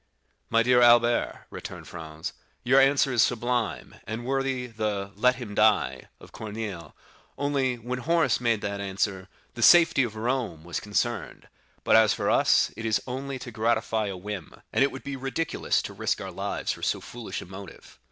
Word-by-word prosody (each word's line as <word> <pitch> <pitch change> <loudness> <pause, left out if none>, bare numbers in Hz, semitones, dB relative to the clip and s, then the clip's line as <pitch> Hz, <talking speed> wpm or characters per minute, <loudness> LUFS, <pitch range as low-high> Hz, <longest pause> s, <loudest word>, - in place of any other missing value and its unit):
"My 115 0 +3
dear 125 0 +4
Albert," 120 0 +4
returned - - -8
Franz, 80 -2 -7 0.3
"your 130 +3 +5
answer 135 0 +3
is 120 - +4
sublime, 120 -2 -1
and 115 +2 -5
worthy 135 -1 -1
the 105 -4 -3
'Let 125 +5 +3
him 120 -5 -7
die,' 80 -13 +2
of - - -15
Corneille, 105 -7 -6 0.4
only, 140 -3 0
when 125 +2 -4
Horace 165 +1 +2
made 115 -3 +1
that 100 0 -3
answer, 95 -1 -2 0.2
the 120 - -7
safety 165 +1 +7
of 115 -4 -2
Rome 115 -8 -2
was 85 0 -4
concerned; 110 +2 -3 0.3
but, - - +4
as 110 -1 +5
for - - 0
us, - - +3
it 115 - -7
is 110 -1 +1
only 135 +1 -4
to 120 - -8
gratify 110 -1 0
a 95 -2 -5
whim, 95 -3 -7
and - - +4
it 140 - +2
would 135 - -9
be 140 - -5
ridiculous 135 +5 -1
to - - -6
risk - - -1
our - - -6
lives - - -3
for - - -7
so - - 0
foolish 115 -5 -7
a - - -8
motive." 95 +1 -12
115 Hz, 180 wpm, -26 LUFS, 105-125 Hz, 0.4 s, safety